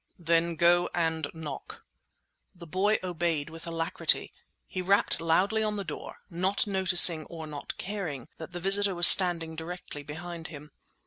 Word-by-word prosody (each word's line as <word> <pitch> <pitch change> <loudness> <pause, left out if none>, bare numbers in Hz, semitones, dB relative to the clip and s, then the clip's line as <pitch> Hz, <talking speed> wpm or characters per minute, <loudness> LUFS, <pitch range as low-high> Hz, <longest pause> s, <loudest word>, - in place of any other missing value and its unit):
"Then 170 0 0
go 175 +1 +3
and 160 -3 -1
knock!" 155 -4 -9 0.7
The 175 -1 -12
boy 190 +6 +1
obeyed 170 -4 -2
with 165 +1 -11
alacrity. 165 0 0 0.3
He 185 - -5
rapped 195 -2 +1
loudly 185 +7 +1
on 215 -1 -1
the 200 - -4
door, - - -9
not 185 +2 -1
noticing 180 -5 +5
or 165 -2 -9
not 150 -2 -8
caring 180 - -5
that 160 +2 -9
the 175 - -6
visitor 195 +1 +1
was 175 0 +4
standing 170 -4 +6
directly 165 -2 -8
behind 165 +3 -8
him. 150 -1 -12
170 Hz, 150 wpm, -28 LUFS, 160-185 Hz, 0.7 s, standing